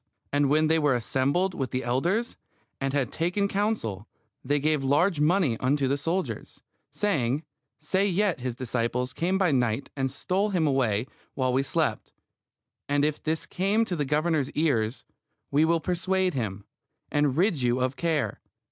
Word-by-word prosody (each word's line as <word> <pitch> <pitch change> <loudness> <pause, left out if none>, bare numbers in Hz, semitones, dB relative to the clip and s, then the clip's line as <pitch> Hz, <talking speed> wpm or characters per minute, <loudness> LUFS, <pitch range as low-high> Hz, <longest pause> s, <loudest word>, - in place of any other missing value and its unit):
And 145 -1 +3
when 155 +2 +4
they 160 +1 +3
were 145 -4 +3
assembled 140 - +1
with 135 -6 -3
the 130 0 -2
elders, 175 - 0 0.4
and 135 0 -1
had 135 -3 0
taken 180 +5 0
counsel, 195 - -2 0.4
they 145 +3 +1
gave 150 -1 +1
large 150 +5 +2
money 150 - +2
unto 135 +1 +1
the 135 - +1
soldiers, 170 +6 -3 0.3
saying, 145 - 0 0.4
Say 190 +6 +1
yet 195 -2 +1
his 125 -1 -3
disciples 125 +1 -2
came 185 +3 0
by 190 -4 +2
night 125 -1 0
and 135 -2 0
stole 185 +9 -1
him 180 -5 +1
away 125 -6 +1 0.3
while 130 -2 0
we 130 - +3
slept. 135 - -1 0.8
And 145 0 +2
if 150 -1 -1
this 160 +1 -1
come 200 +5 +1
to 185 - -3
the 150 - 0
governor's 150 0 +1
ears, 130 -7 0 0.5
we 150 +3 +4
will 165 +1 +2
persuade 185 +2 0
him, 105 -6 -3 0.5
and 145 -2 +1
rid 175 -5 +2
you 125 +1 +1
of 130 +1 0
care. 160 -3 -1
145 Hz, 165 wpm, -27 LUFS, 130-175 Hz, 0.8 s, when